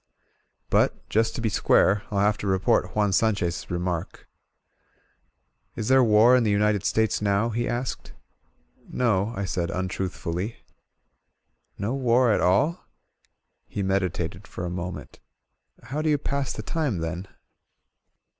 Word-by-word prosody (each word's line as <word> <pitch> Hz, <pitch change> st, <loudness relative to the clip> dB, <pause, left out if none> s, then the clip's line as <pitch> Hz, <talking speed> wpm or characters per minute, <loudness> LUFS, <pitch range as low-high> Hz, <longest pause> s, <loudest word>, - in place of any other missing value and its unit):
But, -, -, +1 dB
just 110 Hz, +1 st, +1 dB
to -, -, -3 dB
be 115 Hz, -, +1 dB
square, 100 Hz, 0 st, +3 dB
FU -, -, -5 dB
have 105 Hz, +1 st, +3 dB
to 100 Hz, -, -4 dB
report 95 Hz, -1 st, +1 dB
Juan 105 Hz, -2 st, +2 dB
San 110 Hz, +1 st, +3 dB
chez' 85 Hz, -2 st, -3 dB
remark: 90 Hz, -1 st, -4 dB
i -, -, -24 dB
"Is 110 Hz, -, -2 dB
there 130 Hz, 0 st, +6 dB
war 115 Hz, +2 st, +6 dB
in 125 Hz, -, +4 dB
the 110 Hz, -, +1 dB
United 105 Hz, -1 st, +2 dB
States 110 Hz, -1 st, +1 dB
now?" 100 Hz, +2 st, +1 dB
be 120 Hz, +1 st, -2 dB
asked. 120 Hz, +1 st, -4 dB, 0.7 s
y -, -, -32 dB
"No," 110 Hz, -4 st, +1 dB
I 100 Hz, -, -2 dB
said 90 Hz, -2 st, -2 dB
untruthfully. 95 Hz, +2 st, -3 dB, 1.2 s
"No 105 Hz, +5 st, -2 dB
war 125 Hz, -2 st, +3 dB
at -, -, +2 dB
all?" 145 Hz, -, +2 dB, 0.8 s
He 100 Hz, -, -4 dB
meditated 95 Hz, -1 st, -2 dB
for 90 Hz, -, -6 dB
a 85 Hz, -, -4 dB
moment. 90 Hz, +1 st, -6 dB, 0.6 s
How 140 Hz, +6 st, -4 dB
do 155 Hz, -, 0 dB
you 150 Hz, -, +3 dB
pass 140 Hz, -2 st, -2 dB
the 110 Hz, -, -6 dB
time, 145 Hz, -, -1 dB
then 85 Hz, +3 st, -4 dB
105 Hz, 145 wpm, -25 LUFS, 95-115 Hz, 1.2 s, there